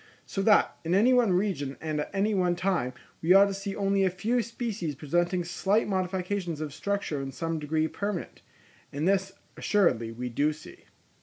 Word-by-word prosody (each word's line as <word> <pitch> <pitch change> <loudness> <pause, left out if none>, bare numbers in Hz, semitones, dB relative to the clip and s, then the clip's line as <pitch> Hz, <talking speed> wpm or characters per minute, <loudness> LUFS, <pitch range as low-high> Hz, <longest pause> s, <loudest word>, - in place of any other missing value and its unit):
So 195 - -3
that, 210 +1 +4
in 170 +2 +1
any 235 +6 +5
one 245 -5 +4
region 180 -8 -1
and 155 -1 -3
at - - -5
any 205 +2 +1
one 180 -3 +2
time, 175 -9 0 0.3
we 175 +3 +5
ought 200 +1 +8
to 200 - -2
see 195 0 -5
only 195 -1 +1
a 190 - +3
few 220 +7 0
species 225 - -4
presenting 175 +5 0
slight 195 +5 +1
modifications 185 -3 -2
of 155 -2 -4
structure 200 -4 -2
in 135 0 -5
some 165 +3 -3
degree 155 +1 0
permanent; 200 +1 -4 0.5
and 145 +4 -1
this 195 0 +1 0.2
assuredly 125 - +2
we 125 +2 -5
do 145 +6 +1
see. 155 +1 -14
185 Hz, 180 wpm, -28 LUFS, 155-200 Hz, 0.5 s, ought